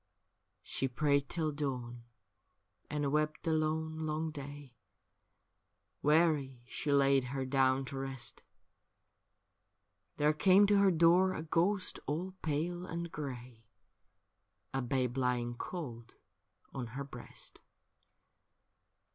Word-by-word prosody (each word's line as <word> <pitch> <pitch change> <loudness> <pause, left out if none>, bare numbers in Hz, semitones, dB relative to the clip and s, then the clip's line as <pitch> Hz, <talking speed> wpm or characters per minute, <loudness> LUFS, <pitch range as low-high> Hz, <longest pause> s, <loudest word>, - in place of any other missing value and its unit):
She 135 - -1
prayed 140 +2 +1
till 160 -3 -1
dawn, 125 -5 -4 0.8
and 145 -2 -1
wept 155 +1 0
the 165 - +1
lone, 160 0 0
long 155 0 -2
day, 145 -2 -8 1.3
Weary 150 -5 +2
she 145 +3 -3
laid 140 -2 +4
her 135 +1 -3
down 135 0 +2
to 135 +1 -5
rest; 135 -4 -4 1.8
There 150 +1 +3
came 190 +6 +6
to 205 0 +4
her 200 -1 +6
door 175 +2 +5
a 155 - -4
ghost 180 +4 0
all 170 +6 -2
pale 165 +4 -1
and 170 -1 -4
grey, 125 -6 -7 1.1
A 135 - 0
babe 125 0 0
lying 125 -1 0
cold 120 -4 -6 0.6
on 130 -3 -4
her 140 - -2
breast. 125 -3 -5
145 Hz, 110 wpm, -33 LUFS, 130-160 Hz, 1.8 s, came